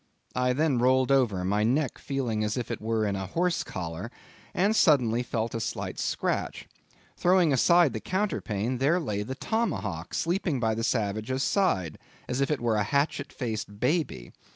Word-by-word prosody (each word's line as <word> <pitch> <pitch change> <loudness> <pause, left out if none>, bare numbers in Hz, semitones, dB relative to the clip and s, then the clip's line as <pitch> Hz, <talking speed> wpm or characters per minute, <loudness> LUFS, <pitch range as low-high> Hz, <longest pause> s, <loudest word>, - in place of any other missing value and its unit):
I 125 0 +2
then 145 -2 +1
rolled 130 +2 +3
over, 115 -9 +2
my 100 +3 +1
neck 130 +4 0
feeling 125 -6 -2
as 105 +3 -1
if 120 - -3
it - - -4
were 110 0 0
in 100 -1 -1
a 95 -1 -4
horse 175 - 0
collar; 85 +5 -5 0.4
and 200 +4 +2
suddenly 125 - +4
felt 115 -2 -2
a 115 - -2
slight 110 - -4
scratch. - - -2 0.5
Throwing 175 -4 +3
aside 170 +2 +4
the 110 - -3
counterpane, 125 - -2
there 150 +7 +3
lay 105 - -2
the 130 +6 -5
tomahawk 140 - -2
sleeping 170 -4 0
by 110 -1 +1
the 115 +1 -3
savage's 110 +4 -1
side, 95 - +1 0.3
as 125 +2 -1
if 140 - +1
it 150 -5 -1
were 115 -2 +1
a 105 - +2
hatchet 140 +5 0
faced 110 -4 -5
baby. 130 - -1
125 Hz, 175 wpm, -27 LUFS, 110-150 Hz, 0.5 s, suddenly